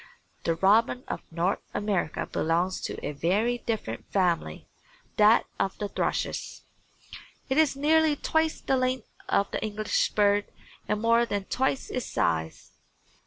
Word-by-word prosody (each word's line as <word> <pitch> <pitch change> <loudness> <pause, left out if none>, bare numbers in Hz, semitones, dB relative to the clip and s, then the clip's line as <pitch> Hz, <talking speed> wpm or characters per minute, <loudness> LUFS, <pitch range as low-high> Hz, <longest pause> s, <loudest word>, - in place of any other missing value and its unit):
The 165 - +2
robin 220 +8 +3
of - - -4
North 170 +4 -1
America 200 -6 -1
belongs 175 +3 0
to - - -4
a - - -2
very 205 +11 0
different 210 - -4
family 180 -4 0 0.5
that 215 +2 +6
of 195 - -1
the 205 - -3
thrushes. - - -2 0.9
It 265 +3 +2
is 305 -4 +3
nearly 310 +2 +3
twice 320 +2 0
the 265 - +1
length 255 -2 -1 0.2
of 200 - +1
the - - -3
English 215 0 0
bird 205 -1 +3 0.4
and 210 0 0
more 230 +1 +3
than 205 -2 -2
twice 265 +6 -1
its 250 - -3
size. 80 -1 -1
210 Hz, 140 wpm, -27 LUFS, 185-255 Hz, 0.9 s, that